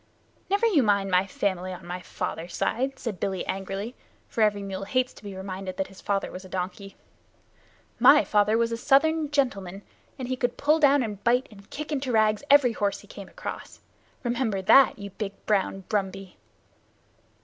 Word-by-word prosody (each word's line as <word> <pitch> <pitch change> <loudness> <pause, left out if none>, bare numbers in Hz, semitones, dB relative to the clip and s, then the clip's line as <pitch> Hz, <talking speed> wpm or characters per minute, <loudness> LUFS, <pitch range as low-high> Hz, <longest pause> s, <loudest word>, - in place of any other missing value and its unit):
"Never 400 +4 +2
you 385 -11 +4
mind 200 -4 +2
my 180 +2 +3
family 185 -2 -2
on 185 0 -9
my 180 +1 -5
father's 170 0 -5
side," 265 +3 -1
said 210 -7 -5
Billy 190 0 -2
angrily, 195 +4 -4 0.3
for 230 - -3
every 205 -2 +2
mule 195 0 -5
hates 255 +4 0
to - - -16
be 200 -2 -7
reminded 190 -1 -6
that 190 - -2
his 195 - -14
father 200 -1 -1
was 185 - -8
a 185 - -12
donkey. 190 +2 -5 1.0
"My - - +7
father 210 +1 +2
was 230 0 +1
a 230 - -2
Southern 300 +4 +3
gentleman, 200 -10 -1 0.3
and 255 -3 -5
he 255 - -1
could 245 -1 -2
pull 305 +3 +3
down 285 -3 +5
and 205 -3 -6
bite 245 +3 +3
and 200 -1 -16
kick 300 +1 -6
into 270 -3 -1
rags 215 -2 +3
every 280 -3 +6
horse 200 -2 -1
he 205 - -18
came 195 -1 -10
across. - - -8 0.4
Remember 240 -4 -1
that, 270 +7 +6
you 200 -1 -8
big 200 0 -5
brown 195 -2 0
Brumby!" 195 -2 -3
205 Hz, 180 wpm, -26 LUFS, 195-255 Hz, 1.0 s, My